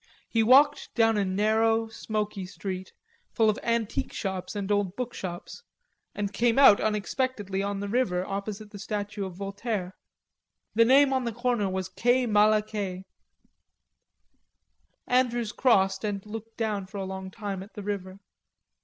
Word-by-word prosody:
He 225 - +1
walked 275 +6 +4
down 225 -1 +4
a 205 - +2
narrow, 220 +4 +2
smoky 210 -3 -4
street 190 -1 -6 0.4
full 220 -2 +3
of 210 - -6
antique 230 -2 -1
shops 190 0 -4
and 200 0 -3
old 205 -2 +1
bookshops 205 - -6 0.5
and 205 -1 -3
came 235 +3 +2
out 270 -7 +8
unexpectedly 210 -1 -1
on 200 0 -2
the 205 - -3
river 200 -5 0
opposite 205 +2 -5
the 205 - -9
statue 205 0 -4
of 185 - -10
Voltaire. 200 0 -4 0.8
The 230 +2 +5
name 270 +2 +5
on 260 -1 0
the 235 - -1
corner 240 -3 0
was 190 0 -2
quai 245 +7 +2
Malaquais. 210 -3 +1 2.0
Andrews 240 -3 +1
crossed 195 -6 +2
and 205 -2 -3
looked 225 +1 -8
down 210 -4 -2
for 200 - -9
a 195 - -3
long 190 0 -6
time 195 -1 -5
at 200 +3 -12
the 205 - -6
river. 195 -2 -4
210 Hz, 145 wpm, -27 LUFS, 195-225 Hz, 2.0 s, out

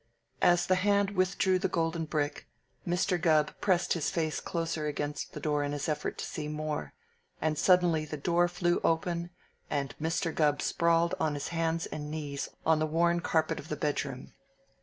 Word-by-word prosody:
As 175 0 +4
the 185 - +3
hand 200 0 +3
withdrew 185 -1 +2
the 190 - +1
golden 165 -1 -1
brick, 150 -1 -2 0.4
Mr. 175 0 +1
Gubb 155 -3 +3
pressed 185 -3 +2
his 165 -4 -1
face 160 -2 -1
closer 165 -2 -2
against 145 0 -3
the - - -6
door 150 -1 0
in 145 0 -2
his 145 - -3
effort 155 -2 -2
to - - -4
see 150 -1 -5
more, 150 0 -4 0.4
and 155 -1 0
suddenly 175 -2 +4
the 155 0 -5
door 175 +4 +2
flew 175 0 0
open 170 +1 0 0.4
and 140 -3 -2
Mr. 165 0 0
Gubb 150 -2 +2
sprawled 170 +1 +2
on 155 -2 +1
his 145 - -4
hands 165 0 0
and 150 -1 -6
knees 145 -2 -4 0.2
on 160 -1 +4
the 155 - +1
worn 170 +2 +2
carpet 160 -1 0
of 150 - -10
the 150 - -1
bedroom. 140 -3 -3
160 Hz, 180 wpm, -30 LUFS, 150-175 Hz, 0.4 s, As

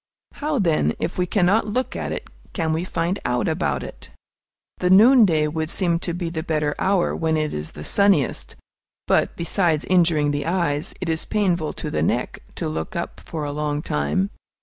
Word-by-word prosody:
How, 300 0 -2
then, 160 - +2
if - - -3
we 180 - +1
cannot 200 +4 +2
look 250 +5 -2
at - - -3
it, - - -5 0.3
can 160 -4 0
we 160 +2 -1
find 180 +1 -2
out 125 0 0
about - - -1
it? - - -10 0.7
The 180 - +1
noonday 200 - +6
would 160 +1 -3
seem 170 -2 +1
to 175 - -3
be 175 -2 -3
the 160 -2 -3
better 155 -2 -1
hour, 190 -2 +1
when 160 -1 0
it 155 -1 -1
is 75 +1 -5
the 75 - -8
sunniest; 200 - +1 0.5
but, - - +2
besides 170 -2 0
injuring 165 -5 +3
the 145 +1 -2
eyes, 170 -4 -1
it 185 - -3
is 160 -1 -1
painful 180 -7 0
to - - -6
the - - -1
neck - - -1 0.2
to - - -2
look 80 +1 -4
up - - -4
for 160 -2 -5
a 145 - -3
long 150 0 -2
time. 75 +7 -1
165 Hz, 190 wpm, -22 LUFS, 150-185 Hz, 0.7 s, noonday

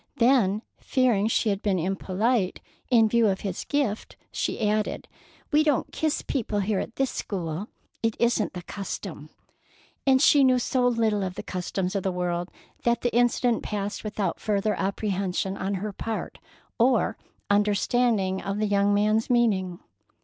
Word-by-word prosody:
Then, 230 -4 +3 0.2
fearing 240 -6 +2
she 225 0 +1
had 200 0 -1
been 200 -3 +1
impolite 195 +4 0 0.3
in 230 -3 +5
view 230 0 +3
of 190 -2 0
his 190 -3 -4
gift, 275 -8 -2
she 215 - -1
added: 210 0 -1 0.4
"We 300 0 +5
don't 295 -4 +1
kiss 310 -1 -1
people 215 -6 -1
here 200 0 0
at 230 - -5
this 270 -1 0
school. 180 -1 -4 0.3
It 225 -1 0
isn't 235 -3 +1
the 180 -1 -7
custom." 195 +3 -6 0.8
And 265 -1 +6
she 290 0 +6
knew 255 -1 +5
so 250 0 +1
little 225 -4 +1
of 185 -2 -3
the - - -6
customs 185 +1 -3
of 195 - +1
the 190 - -1
world 175 0 -2 0.3
that 235 0 +1
the 240 -1 -1
incident 240 0 +2
passed 205 -1 -4
without 205 -4 -2
further 210 0 0
apprehension 195 -1 -1
on 195 +1 -2
her 205 +2 -4
part, 225 +3 -5 0.4
or 240 0 +3 0.4
understanding 205 -1 +2
of 195 +1 -3
the 215 - +1
young 200 0 +2
man's 215 +3 +2
meaning. 195 -7 +1
210 Hz, 155 wpm, -26 LUFS, 195-235 Hz, 0.8 s, And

